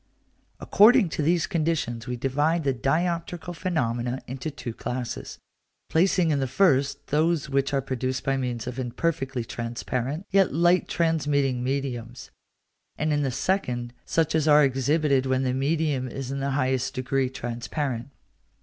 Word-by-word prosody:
According 220 -1 +5
to 155 - -3
these 165 +3 +2
conditions 155 - -1
we 125 - -2
divide 145 +6 0
the 135 -1 +1
dioptrical 170 +6 -1
phenomena 125 -8 -1
into 130 +5 -5
two 130 -5 -6
classes, 125 +1 -5 0.5
placing 180 0 +3
in 145 - +1
the 135 - 0
first 140 -2 +2
those 155 -1 +1
which 140 +1 +1
are 135 -1 0
produced 130 0 -2
by 135 - +1
means 125 -4 -3
of 125 +1 -5
imperfectly 135 -1 -2
transparent, 125 - -4
yet 195 -1 +4
light 175 +2 +3
transmitting 145 -6 +1
mediums; 125 -3 -4 0.7
and 155 0 0
in 145 - +1
the 135 - 0
second 125 -5 -1
such 160 -1 0
as 160 -1 +1
are 150 0 +7
exhibited 135 +1 +2
when 130 0 +1
the 130 -1 0
medium 140 -1 0
is 135 +1 -5
in 140 - -3
the 135 +1 -1
highest 130 -2 0
degree 130 +1 0
transparent. 120 +1 -4
135 Hz, 150 wpm, -26 LUFS, 125-160 Hz, 0.7 s, are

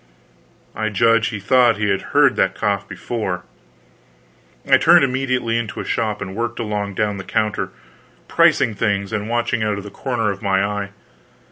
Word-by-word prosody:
I 110 0 -1
judge 115 +2 +3
he 105 -3 -4
thought 120 +2 +3
he 105 -1 0
had 95 -1 +1
heard - - +3
that - - +1
cough 100 -1 -1
before. 95 -7 -4 1.2
I - - +6
turned - - +6
immediately 130 -3 0
into 110 -4 -5
a - - -4
shop 110 -4 -2
and 95 0 -8
worked 115 +1 -3
along 105 -3 -3
down 105 -1 -1
the 95 - -6
counter, 110 +1 -1 0.6
pricing 115 - +3
things 100 -1 -1
and 105 0 -3
watching 120 0 0
out 105 -1 0
of 100 - -6
the 105 - -9
corner 115 -6 -2
of 100 - -7
my 95 0 +1
eye. 100 -1 -3
105 Hz, 170 wpm, -20 LUFS, 100-115 Hz, 1.2 s, I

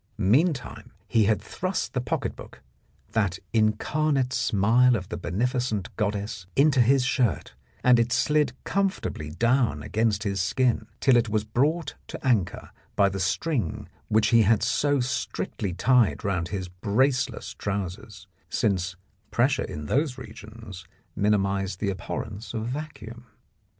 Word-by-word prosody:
Meantime, 130 - +1
he 110 -2 +3
had 105 +1 +2
thrust 185 +1 -3
the 125 - 0
pocket 115 - -2
book - - -13 0.2
— - - -36
that 100 -5 0 0.2
incarnate 130 +5 +1
smile 120 +5 +3
of 95 -5 -4
the - - -4
beneficent 115 0 -2
goddess 100 -3 -3
— - - -33
into 140 -2 +4
his 130 +2 +4
shirt, 125 -3 0 0.3
and 125 -1 +6
it 115 +1 +1
slid 150 -2 +2
comfortably 195 - -1
down 115 - +1
against 110 -2 0
his 100 -2 -1
skin, 120 +2 +1
till 130 - +4
it 115 -2 +3
was 105 0 0
brought 145 +8 0
to - - -6
anchor 115 -9 0 0.2
by 100 -1 +4
the 95 0 -4
string 95 - -1 0.2
which 110 0 +3
he 115 -1 +6
had 110 0 +3
so 145 -1 +2
strictly 120 -5 -3
tied 120 +5 +2
round 90 -4 0
his 95 -2 -4
braceless 115 +9 0
trousers, 95 -3 -5 0.2
since 95 -3 0 0.3
pressure 130 +5 +2
in 75 -1 -6
those 135 - 0
regions 110 -5 -10 0.3
minimised 100 -2 0
the 100 -2 0
abhorrence 100 +5 -6
of 110 0 -2
vacuum. 120 -4 -7
110 Hz, 140 wpm, -26 LUFS, 100-125 Hz, 0.3 s, and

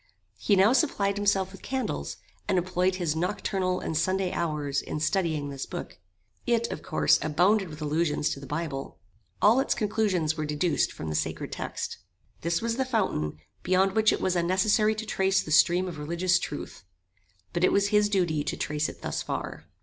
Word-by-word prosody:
He 205 - +3
now 195 +5 +5
supplied 200 -9 +1
himself 195 -2 +1
with 195 - -12
candles, 210 - -3 0.3
and 190 - +2
employed 180 +1 +1
his 170 -4 -1
nocturnal 185 +1 -1
and 160 - -4
Sunday 185 +3 +1
hours 150 -4 -1
in - - -5
studying 155 -4 0
this 135 -1 -5
book. - - -7 0.5
It, 235 -1 +2
of - - -5
course, - - +3
abounded 180 +5 +2
with 155 0 -7
allusions 150 0 0
to - - -4
the 140 - -10
Bible. 150 -2 -4 0.5
All 220 +5 +6
its 270 - +1
conclusions 200 -7 0
were 155 - -3
deduced 150 +3 +1
from 80 - -6
the 75 - -2
sacred 80 - -2
text. - - -4 0.4
This 170 +4 0
was 230 0 -1
the 265 - +2
fountain, 195 - -1 0.2
beyond 190 +1 +2
which 220 +1 +4
it - - -1
was 185 -1 +1
unnecessary 190 +5 +2
to 220 +1 -5
trace 195 -2 +1
the 155 - -7
stream 175 +4 +4
of 165 -4 -6
religious 170 +4 +1
truth; 145 -9 -6 0.7
but 175 0 -1
it - - +5
was 200 0 +2
his 210 0 +3
duty 175 -7 +1
to - - -3
trace 150 +1 -1
it - - -12
thus - - -2
far. - - -5
180 Hz, 185 wpm, -27 LUFS, 155-200 Hz, 0.7 s, All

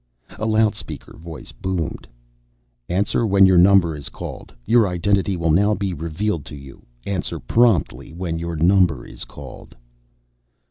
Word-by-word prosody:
A 110 - -1
loudspeaker 110 -1 -1
voice 80 0 -10
boomed, 90 -5 -4 0.8
"Answer 100 +6 0
when 100 -3 +5
your 95 -2 +5
number 90 -3 +5
is 70 - -7
called. - - -8
Your 115 -3 +4
identity 95 +1 0
will 85 -2 +1
now 100 +6 +3
be 100 -1 -2
revealed 85 +2 -3
to - - -9
you. 70 -3 -13 0.2
Answer 95 -4 -3
promptly 115 - +1
when 85 -1 -4
your 85 0 -4
number 85 -4 +3
is - - -9
called." - - -12
90 Hz, 140 wpm, -21 LUFS, 80-100 Hz, 0.8 s, when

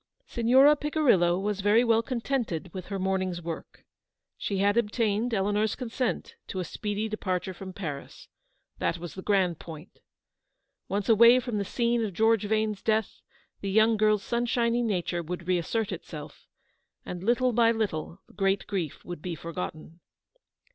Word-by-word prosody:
Signora 260 - +5
Picirillo 265 - +2
was 205 0 -2
very 210 +4 +4
well 230 -2 +3
contented 230 - -3
with 185 -2 -7
her 195 - -3
morning's 185 -2 -1
work. 165 -1 -8 0.5
She 200 - -3
had 200 +2 +3
obtained 225 0 +1
Eleanor's 210 +1 +1
consent 250 0 -3
to 190 - -4
a - - -1
speedy 210 +3 -3
departure 185 -3 -2
from 190 +1 -8
Paris; 160 -7 -7 0.5
that 170 - 0
was 175 0 -8
the 190 - -7
grand 185 -5 +1
point. 160 0 -11 0.9
Once 200 0 -2
away 235 +2 +7
from 240 -4 -3
the - - 0
scene 235 +3 0
of 205 -3 -3
George 220 0 +3
Vane's 215 -1 0
death, 220 -1 0 0.4
the 195 - -4
young 220 +3 +4
girl's 215 -1 +2
sunshiny 235 0 +1
nature 180 -6 -1
would 175 +1 -6
reassert 185 +5 0
itself, 155 -4 -8 0.6
and 180 -1 -6
little 245 +3 +2
by 230 0 +4
little 195 -5 -3
the - - -21
great 195 0 +1
grief 180 -8 -4
would 175 -3 -7
be 175 0 -4
forgotten. 165 0 -7
205 Hz, 155 wpm, -28 LUFS, 180-230 Hz, 0.9 s, away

